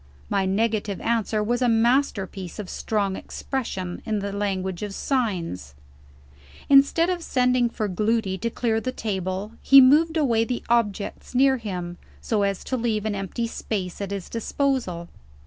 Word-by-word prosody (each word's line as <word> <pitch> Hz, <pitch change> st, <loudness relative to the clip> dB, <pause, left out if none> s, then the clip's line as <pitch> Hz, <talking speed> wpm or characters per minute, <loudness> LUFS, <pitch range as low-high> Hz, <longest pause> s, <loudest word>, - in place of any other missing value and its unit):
My 195 Hz, -1 st, +1 dB
negative 210 Hz, 0 st, 0 dB
answer 225 Hz, -2 st, 0 dB
was 240 Hz, +3 st, 0 dB
a 250 Hz, -, +3 dB
masterpiece 225 Hz, -6 st, +1 dB
of 205 Hz, -4 st, -6 dB
strong 200 Hz, -3 st, -1 dB
expression, 190 Hz, -11 st, -4 dB
in 220 Hz, -2 st, -1 dB
the 200 Hz, 0 st, -3 dB
language 190 Hz, -3 st, -2 dB
of 205 Hz, -2 st, -4 dB
signs. 175 Hz, -, -2 dB, 0.9 s
Instead 280 Hz, +5 st, +5 dB
of 355 Hz, -1 st, -2 dB
sending 250 Hz, -4 st, +2 dB
for 215 Hz, -2 st, -3 dB
Gloody 210 Hz, +1 st, 0 dB
to 230 Hz, -, -1 dB
clear 225 Hz, -1 st, 0 dB
the 255 Hz, -, -2 dB
table, 190 Hz, -2 st, -3 dB
he 275 Hz, -, +8 dB
moved 310 Hz, +5 st, +5 dB
away 235 Hz, -7 st, +3 dB
the 245 Hz, +1 st, -3 dB
objects 225 Hz, 0 st, -1 dB
near 265 Hz, +1 st, +4 dB
him, 180 Hz, -6 st, -5 dB, 0.2 s
so 215 Hz, -3 st, 0 dB
as 200 Hz, -1 st, -1 dB
to 260 Hz, -, -2 dB
leave 225 Hz, -3 st, -1 dB
an 215 Hz, -, 0 dB
empty 195 Hz, +4 st, -3 dB
space 200 Hz, -5 st, -4 dB
at 200 Hz, -, -3 dB
his 200 Hz, -2 st, -5 dB
disposal. 230 Hz, -7 st, -1 dB
215 Hz, 155 wpm, -24 LUFS, 195-245 Hz, 0.9 s, he